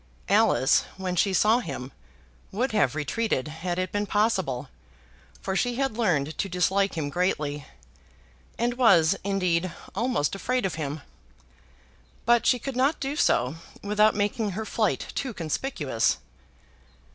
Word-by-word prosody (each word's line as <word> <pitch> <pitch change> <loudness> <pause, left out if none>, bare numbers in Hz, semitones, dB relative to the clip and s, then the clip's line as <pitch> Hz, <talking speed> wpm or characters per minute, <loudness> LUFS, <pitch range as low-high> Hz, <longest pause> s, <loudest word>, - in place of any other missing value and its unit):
Alice, 200 -9 +4
when 185 -1 -3
she 195 +3 +2
saw 215 +5 +4
him, 130 - -6 0.6
would 240 +6 -1
have 150 - +2
retreated 155 - -1
had 170 +3 -4
it 185 0 -2
been 205 0 -1
possible, 190 - 0 0.7
for 190 - -2
she 245 +4 0
had 270 -3 -1
learned 160 -10 0
to 195 - -1
dislike 190 +2 +1
him 150 -3 -1
greatly, 150 -5 -1 0.9
and 240 +2 -1
was, 170 -10 +5
indeed, 185 -3 0 0.2
almost 230 - 0
afraid 250 +3 -1
of 185 - -1
him; 150 -1 -4 1.2
but 235 0 +4
she 250 - +5
could 265 +2 -5
not 270 +5 +2
do 275 +1 -3
so 130 - +2 0.3
without 210 +1 +3
making 205 0 -1
her 220 - -3
flight - - 0
too 260 -5 -3
conspicuous. 155 - -1
195 Hz, 135 wpm, -26 LUFS, 160-230 Hz, 1.2 s, was